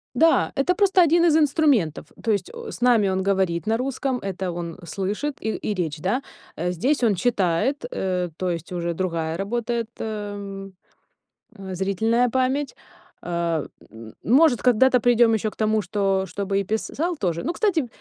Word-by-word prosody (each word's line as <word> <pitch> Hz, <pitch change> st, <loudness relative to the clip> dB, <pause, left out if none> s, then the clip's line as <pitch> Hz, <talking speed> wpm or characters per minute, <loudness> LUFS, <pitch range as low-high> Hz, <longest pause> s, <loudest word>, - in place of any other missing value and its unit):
Да, 325 Hz, 0 st, +4 dB
это 285 Hz, +6 st, +2 dB
просто 385 Hz, -1 st, +4 dB
1 340 Hz, +1 st, +4 dB
из 320 Hz, -2 st, +5 dB
инструментов, 285 Hz, -, +2 dB, 0.2 s
то 225 Hz, -, +1 dB
есть, 205 Hz, -, -1 dB
о 470 Hz, -1 st, -7 dB
с -, -, -10 dB
нами 240 Hz, -5 st, +4 dB
он 190 Hz, 0 st, 0 dB
говорит 190 Hz, -2 st, 0 dB
на 225 Hz, +1 st, +2 dB
русском, 265 Hz, +1 st, -2 dB
это 190 Hz, -2 st, -4 dB
он 170 Hz, 0 st, -6 dB
слышит 205 Hz, -, -3 dB
и 220 Hz, -, -2 dB
и 210 Hz, -, -3 dB
речь, 165 Hz, -5 st, -2 dB
да? 205 Hz, -, -1 dB, 0.3 s
Э, 175 Hz, +2 st, -2 dB
здесь 250 Hz, -, 0 dB
он 220 Hz, -4 st, +3 dB
читает, 205 Hz, +5 st, 0 dB
э, 180 Hz, -2 st, -1 dB
то 185 Hz, -, -1 dB
есть 170 Hz, -1 st, -4 dB
уже 170 Hz, -1 st, -2 dB
другая 165 Hz, -2 st, -2 dB
работает, 230 Hz, +3 st, -2 dB
эм, 205 Hz, -2 st, -6 dB, 0.8 s
э, 190 Hz, -2 st, -7 dB
зрительная 220 Hz, +6 st, +1 dB
память. 260 Hz, +2 st, 0 dB, 0.5 s
А, 170 Hz, -3 st, -1 dB, 0.2 s
э, -, -, -18 dB
м, 110 Hz, -1 st, -11 dB
может, 265 Hz, +2 st, +4 dB
когда-то 250 Hz, +1 st, +4 dB
придем 240 Hz, -1 st, +4 dB
ещё 215 Hz, 0 st, 0 dB
к -, -, -18 dB
тому, 215 Hz, 0 st, +1 dB
что 195 Hz, -1 st, 0 dB
чтобы 195 Hz, +2 st, -2 dB
и -, -, 0 dB
писал 295 Hz, -, -2 dB
тоже. 170 Hz, -, -2 dB
Ну, 335 Hz, -, -1 dB
кстати, 340 Hz, -, +1 dB
210 Hz, 175 wpm, -23 LUFS, 185-255 Hz, 0.8 s, из